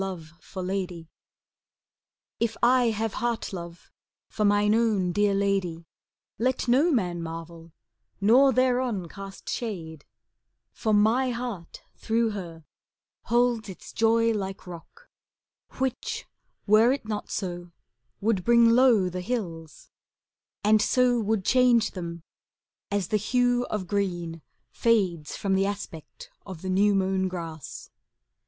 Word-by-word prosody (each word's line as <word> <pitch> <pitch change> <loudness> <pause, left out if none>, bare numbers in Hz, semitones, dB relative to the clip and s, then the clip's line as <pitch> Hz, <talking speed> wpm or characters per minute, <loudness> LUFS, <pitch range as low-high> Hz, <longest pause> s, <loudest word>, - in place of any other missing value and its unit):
IIO 185 -5 -5
CANZONIERE 185 -3 -4 1.3
If 230 -1 -1
I 250 +1 +5
have 225 -1 -1
heart 235 -4 -2
love 170 -1 -9 0.4
for 215 - -2
mine 205 0 +3
own 215 -6 +2
dear 205 +2 +2
lady, 195 -4 -1 0.5
Let 255 +2 0
no 270 +8 +4
man 180 - 0
marvel, 165 0 -8 0.5
nor 245 +7 +5
thereon 250 -6 +1
cast 195 +1 -10
shade; 165 -10 -5 0.7
For 220 - -2
my 220 +5 +3
heart, 235 -8 -6
through 225 0 0
her, 170 -6 -8 0.6
holds 240 -2 +1
its 190 - -10
joy 230 0 +3
like 195 -2 -5
rock, 180 - -12 0.7
Which, 260 -1 -3 0.4
were 220 +4 +5
it 270 -5 -3
not 210 -1 -4
so, 175 -3 -4 0.5
would 205 -3 +1
bring 235 +1 +5
low 235 -6 +5
the 180 0 -4
hills, 175 -8 -5 0.7
And 215 +1 +4
so 245 +2 +3
would 215 -3 -1
change 245 -3 +4
them 170 -3 -7 0.7
as 200 -3 -1
the 215 - +2
hue 245 +3 +1
of 210 -3 -3
green 175 -4 -2 0.3
Fades 185 -9 0
from 195 -1 -1
the 195 +1 +2
aspect 205 - -7
of 185 -4 -9
the 185 - -3
new 200 +2 +3
mown 190 0 +1
grass. 165 -5 -7
205 Hz, 125 wpm, -26 LUFS, 180-235 Hz, 1.3 s, I